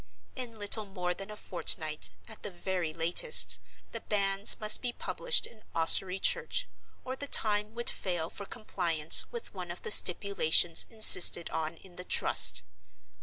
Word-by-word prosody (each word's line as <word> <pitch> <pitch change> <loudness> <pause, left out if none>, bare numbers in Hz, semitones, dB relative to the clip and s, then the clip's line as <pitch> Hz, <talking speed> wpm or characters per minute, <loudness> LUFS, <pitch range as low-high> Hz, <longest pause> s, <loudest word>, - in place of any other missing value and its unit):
In 245 -3 -10
little 210 +1 -5
more 180 -3 -8
than 195 +3 -13
a 210 - -12
fortnight, 155 -5 -1 0.2
at 220 - -16
the - - -9
very 180 -2 -7
latest, 170 - +3 0.3
the - - -11
Banns 200 0 -1
must 215 0 +3
be 245 - -6
published - - -3
in 220 - -16
Ossory 180 +3 +1
church, - - -3 0.4
or 260 - -8
the 285 +2 -11
time 210 -2 -1
would 240 0 -9
fail 175 -4 -7
for 200 - -12
compliance 170 -8 +1
with 470 -1 -9
one 180 -3 -11
of 175 - -11
the - - -6
stipulations 175 -4 +2
insisted 200 -6 +5
on 160 +1 -8
in 180 0 -20
the 180 - -10
Trust. 85 - +3
195 Hz, 160 wpm, -26 LUFS, 175-215 Hz, 0.4 s, insisted